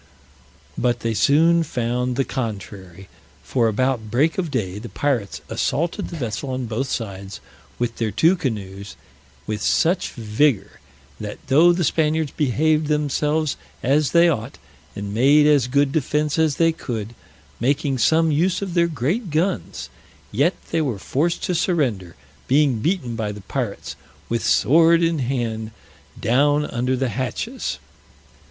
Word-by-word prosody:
But 120 Hz, -1 st, 0 dB
they 115 Hz, -1 st, -1 dB
soon 165 Hz, +8 st, +4 dB
found 125 Hz, -3 st, -1 dB
the 135 Hz, +1 st, 0 dB
contrary, 100 Hz, -6 st, -6 dB, 0.4 s
for 120 Hz, -3 st, +1 dB
about 115 Hz, 0 st, 0 dB
break 145 Hz, -, +1 dB
of 175 Hz, -3 st, -1 dB
day 105 Hz, -8 st, -3 dB
the 115 Hz, +2 st, -8 dB
pirates 125 Hz, -9 st, -2 dB
assaulted 165 Hz, +5 st, -1 dB
the -, -, -8 dB
vessel 120 Hz, 0 st, -4 dB
on 130 Hz, -1 st, -3 dB
both 115 Hz, +4 st, -2 dB
sides, 100 Hz, -4 st, -5 dB, 0.4 s
with 120 Hz, -1 st, -2 dB
their 115 Hz, -2 st, -1 dB
two 165 Hz, -, +3 dB
canoes, 100 Hz, -, -5 dB, 0.5 s
with 105 Hz, -1 st, -3 dB
such 170 Hz, -, +2 dB
vigor, 115 Hz, +1 st, 0 dB, 0.4 s
that 105 Hz, -1 st, -6 dB
though 160 Hz, +6 st, +6 dB
the 175 Hz, 0 st, 0 dB
Spaniards 155 Hz, 0 st, +1 dB
behaved 155 Hz, +2 st, +1 dB
themselves 150 Hz, +1 st, 0 dB, 0.3 s
as 140 Hz, +3 st, +2 dB
they 170 Hz, 0 st, +6 dB
ought, 125 Hz, -6 st, -2 dB, 0.4 s
and 100 Hz, 0 st, -5 dB
made 140 Hz, +6 st, +5 dB
as 145 Hz, -5 st, +4 dB
good 140 Hz, +2 st, +2 dB
defense 150 Hz, +1 st, 0 dB
as 155 Hz, -3 st, +2 dB
they 165 Hz, 0 st, +3 dB
could, 115 Hz, -8 st, -5 dB, 0.5 s
making 135 Hz, +1 st, 0 dB
some 160 Hz, +5 st, +3 dB
use 175 Hz, +6 st, +1 dB
of 190 Hz, -3 st, -5 dB
their 170 Hz, -1 st, +3 dB
great 170 Hz, -, -2 dB
guns, 155 Hz, -, -2 dB, 0.4 s
yet 145 Hz, -, +2 dB, 0.2 s
they 165 Hz, -, +1 dB
were 130 Hz, -9 st, -1 dB
forced 160 Hz, -, -1 dB
to 180 Hz, -, 0 dB
surrender, 130 Hz, -, 0 dB, 0.3 s
being 135 Hz, -3 st, +3 dB
beaten 130 Hz, -, -1 dB
by 110 Hz, -2 st, -2 dB
the 105 Hz, 0 st, -9 dB
pirates, 115 Hz, +1 st, -4 dB, 0.3 s
with 115 Hz, 0 st, -1 dB
sword 165 Hz, +3 st, +4 dB
in 165 Hz, -2 st, +1 dB
hand, 120 Hz, -4 st, -2 dB, 0.5 s
down 145 Hz, +5 st, +2 dB
under 125 Hz, 0 st, -1 dB
the 130 Hz, 0 st, 0 dB
hatches. 130 Hz, -, -3 dB
135 Hz, 145 wpm, -22 LUFS, 115-155 Hz, 0.5 s, though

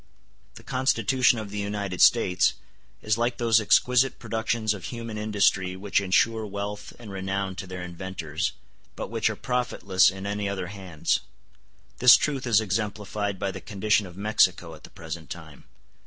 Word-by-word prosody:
The -, -, -13 dB
Constitution 130 Hz, -1 st, +2 dB
of 105 Hz, -2 st, -6 dB
the 105 Hz, -, -4 dB
United 100 Hz, -3 st, -3 dB
States 95 Hz, -6 st, +4 dB, 0.5 s
is 110 Hz, +1 st, +1 dB
like 120 Hz, +1 st, 0 dB
those 115 Hz, -2 st, +3 dB
exquisite 125 Hz, +5 st, +3 dB
productions 110 Hz, -1 st, -1 dB
of 100 Hz, -4 st, -8 dB
human 115 Hz, -2 st, -6 dB
industry 105 Hz, -3 st, +1 dB
which 100 Hz, 0 st, 0 dB
ensure 110 Hz, +4 st, +2 dB
wealth 100 Hz, 0 st, -5 dB
and 115 Hz, -4 st, -10 dB
renown 95 Hz, 0 st, -3 dB
to 95 Hz, -, -6 dB
their 90 Hz, -1 st, -6 dB
inventors, 90 Hz, +1 st, -4 dB, 0.4 s
but -, -, -6 dB
which 115 Hz, -1 st, +1 dB
are 110 Hz, -, -3 dB
profitless 100 Hz, -7 st, +2 dB
in 95 Hz, +1 st, -7 dB
any 100 Hz, 0 st, -2 dB
other 95 Hz, -3 st, -4 dB
hands. 95 Hz, -6 st, -1 dB, 0.8 s
This 125 Hz, 0 st, +9 dB
truth 135 Hz, -4 st, -2 dB
is 110 Hz, -3 st, +5 dB
exemplified 105 Hz, -1 st, -2 dB
by 100 Hz, +1 st, -2 dB
the -, -, -8 dB
condition 105 Hz, 0 st, 0 dB
of 90 Hz, 0 st, -13 dB
Mexico 95 Hz, -5 st, +2 dB
at 75 Hz, -, -13 dB
the -, -, -14 dB
present 80 Hz, -2 st, -8 dB
time. 80 Hz, -4 st, -10 dB
100 Hz, 160 wpm, -26 LUFS, 95-110 Hz, 0.8 s, This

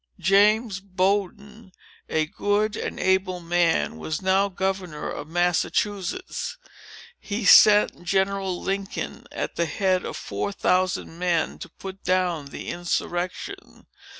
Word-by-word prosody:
James 200 Hz, +3 st, +3 dB
Bowdoin, 200 Hz, +2 st, -2 dB, 0.4 s
a 155 Hz, 0 st, +1 dB
good 205 Hz, +6 st, 0 dB
and -, -, -4 dB
able 190 Hz, -1 st, +1 dB
man, 170 Hz, -, +1 dB
was 155 Hz, -, -3 dB
now 195 Hz, +1 st, +2 dB
governor 190 Hz, -4 st, -3 dB
of 145 Hz, -, -6 dB
Massachusetts. 190 Hz, -, -1 dB, 0.6 s
He 210 Hz, +1 st, -4 dB
sent 210 Hz, -3 st, +7 dB
General 190 Hz, 0 st, 0 dB
Lincoln, 195 Hz, 0 st, -4 dB
at -, -, -4 dB
the 170 Hz, -, +1 dB
head 185 Hz, +2 st, +1 dB
of -, -, -5 dB
four 100 Hz, 0 st, -3 dB
thousand 185 Hz, -, 0 dB
men, 175 Hz, -3 st, 0 dB
to 185 Hz, -, -8 dB
put 190 Hz, +3 st, -10 dB
down 180 Hz, -5 st, 0 dB
the -, -, -7 dB
insurrection. 175 Hz, -, -4 dB
190 Hz, 120 wpm, -24 LUFS, 175-200 Hz, 0.6 s, sent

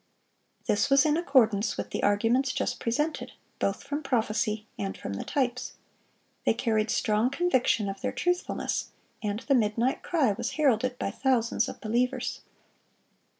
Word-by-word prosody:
This 205 Hz, -, +2 dB
was 275 Hz, +1 st, +5 dB
in 300 Hz, -1 st, +3 dB
accordance 235 Hz, -, +2 dB
with -, -, -4 dB
the -, -, -2 dB
arguments 230 Hz, +6 st, +2 dB
just -, -, -2 dB
presented, 295 Hz, +8 st, -1 dB, 0.3 s
both 195 Hz, -, -1 dB
from 285 Hz, +2 st, -3 dB
prophecy 220 Hz, -4 st, 0 dB
and 195 Hz, -1 st, -4 dB
from 100 Hz, -, -5 dB
the 100 Hz, -, -4 dB
types. 255 Hz, -2 st, -1 dB, 0.7 s
They -, -, +2 dB
carried 220 Hz, -2 st, 0 dB
strong 215 Hz, +3 st, +2 dB
conviction 260 Hz, -, +1 dB
of 195 Hz, 0 st, -5 dB
their -, -, -1 dB
truthfulness; 355 Hz, 0 st, -1 dB, 0.3 s
and 210 Hz, 0 st, -2 dB
the 275 Hz, -, +1 dB
"midnight 235 Hz, +1 st, +1 dB
cry" 300 Hz, -10 st, +2 dB
was 230 Hz, +4 st, -3 dB
heralded 255 Hz, -4 st, +2 dB
by 195 Hz, -, -2 dB
thousands 235 Hz, -2 st, +1 dB
of -, -, -8 dB
believers. 245 Hz, +4 st, -1 dB
240 Hz, 150 wpm, -28 LUFS, 215-275 Hz, 0.7 s, was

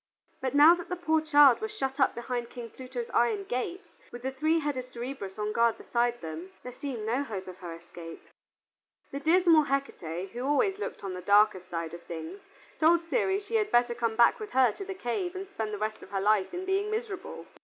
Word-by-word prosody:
But 260 Hz, +1 st, -2 dB
now 300 Hz, +4 st, +9 dB
that 350 Hz, 0 st, -5 dB
the 360 Hz, -, -1 dB
poor 320 Hz, -3 st, +1 dB
child 290 Hz, -4 st, +6 dB
was 440 Hz, 0 st, -3 dB
shut 270 Hz, -3 st, -2 dB
up 270 Hz, -, +3 dB
behind 240 Hz, 0 st, -4 dB
King 235 Hz, -2 st, -8 dB
Pluto's 255 Hz, -2 st, -6 dB
iron 230 Hz, -4 st, +2 dB
gates, 255 Hz, -, -4 dB, 0.3 s
with 240 Hz, 0 st, -9 dB
the 265 Hz, -, -1 dB
three 310 Hz, +5 st, +1 dB
headed 270 Hz, -5 st, -3 dB
Cerberus 235 Hz, -5 st, -6 dB
on 210 Hz, 0 st, -2 dB
guard 235 Hz, 0 st, +3 dB
beside 240 Hz, 0 st, -1 dB
them, 160 Hz, +3 st, -7 dB
there 250 Hz, -, -7 dB
seemed 245 Hz, -5 st, -5 dB
no 240 Hz, +5 st, 0 dB
hope 200 Hz, -8 st, -6 dB
of 185 Hz, -1 st, -9 dB
her 175 Hz, -3 st, -7 dB
escape. 165 Hz, 0 st, -11 dB, 0.9 s
The 275 Hz, -, -4 dB
dismal 325 Hz, 0 st, +5 dB
Hecate, 190 Hz, -, -3 dB
who 240 Hz, +2 st, -5 dB
always 380 Hz, +9 st, +1 dB
looked 420 Hz, -, -5 dB
on 195 Hz, -2 st, -4 dB
the 180 Hz, -, -6 dB
darkest 200 Hz, -2 st, +3 dB
side 165 Hz, -2 st, -4 dB
of 170 Hz, -, -8 dB
things, 170 Hz, +3 st, -7 dB, 0.4 s
told 335 Hz, +2 st, +4 dB
Ceres 385 Hz, +8 st, +1 dB
she 455 Hz, +2 st, 0 dB
had 425 Hz, -1 st, 0 dB
better 240 Hz, 0 st, +3 dB
come 230 Hz, -1 st, -1 dB
back 235 Hz, -, +5 dB
with 430 Hz, -1 st, -7 dB
her 255 Hz, -3 st, +5 dB
to 395 Hz, -, -8 dB
the 390 Hz, 0 st, -6 dB
cave 355 Hz, +5 st, -3 dB
and 385 Hz, +1 st, -5 dB
spend 220 Hz, -, -4 dB
the 210 Hz, -, -3 dB
rest 215 Hz, +1 st, -3 dB
of -, -, -12 dB
her 195 Hz, -, -2 dB
life 205 Hz, -1 st, +2 dB
in 360 Hz, +1 st, -5 dB
being 390 Hz, +2 st, 0 dB
miserable. 435 Hz, -2 st, -5 dB
250 Hz, 220 wpm, -29 LUFS, 210-320 Hz, 0.9 s, now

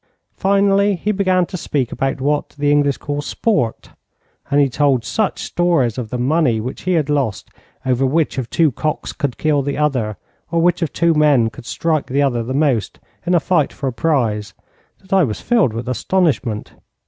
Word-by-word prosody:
Finally, 200 Hz, +1 st, +2 dB
he 205 Hz, +5 st, -1 dB
began 185 Hz, -3 st, +2 dB
to 185 Hz, -, -8 dB
speak 140 Hz, -7 st, -2 dB
about 135 Hz, 0 st, -2 dB
what 145 Hz, +2 st, 0 dB
the 145 Hz, 0 st, +1 dB
English 145 Hz, -2 st, +2 dB
call 145 Hz, 0 st, -4 dB
sport, 145 Hz, -, -1 dB, 0.6 s
and 145 Hz, 0 st, +3 dB
he 140 Hz, -, +5 dB
told 135 Hz, -2 st, +1 dB
such 215 Hz, -3 st, -1 dB
stories 165 Hz, -10 st, +1 dB
of 120 Hz, -4 st, -5 dB
the 125 Hz, -, -3 dB
money 130 Hz, -2 st, +2 dB
which 125 Hz, +5 st, -5 dB
he -, -, +3 dB
had 155 Hz, -5 st, +1 dB
lost 140 Hz, -9 st, -1 dB, 0.3 s
over 130 Hz, 0 st, +1 dB
which 145 Hz, +1 st, +1 dB
of 120 Hz, -3 st, -5 dB
two 160 Hz, -3 st, +2 dB
cocks 155 Hz, +5 st, -3 dB
could 140 Hz, -4 st, -3 dB
kill 150 Hz, -2 st, +1 dB
the 140 Hz, +1 st, -3 dB
other, 125 Hz, -9 st, 0 dB, 0.3 s
or 170 Hz, -, 0 dB
which 175 Hz, +2 st, +2 dB
of 165 Hz, -, -1 dB
two 170 Hz, 0 st, +2 dB
men 145 Hz, -7 st, +3 dB
could 120 Hz, 0 st, -12 dB
strike 160 Hz, -3 st, -1 dB
the 135 Hz, +3 st, -1 dB
other 120 Hz, -4 st, +1 dB
the 115 Hz, +3 st, -5 dB
most 135 Hz, -6 st, 0 dB, 0.3 s
in 180 Hz, -, +3 dB
a -, -, +5 dB
fight 165 Hz, -4 st, +1 dB
for 140 Hz, -, -7 dB
a 130 Hz, -, -1 dB
prize, 115 Hz, -7 st, 0 dB, 0.5 s
that 190 Hz, 0 st, -7 dB
I 190 Hz, -2 st, +5 dB
was 110 Hz, -8 st, -2 dB
filled 230 Hz, -, +2 dB
with 115 Hz, +2 st, -5 dB
astonishment. 130 Hz, -, -1 dB
145 Hz, 195 wpm, -19 LUFS, 125-170 Hz, 0.6 s, he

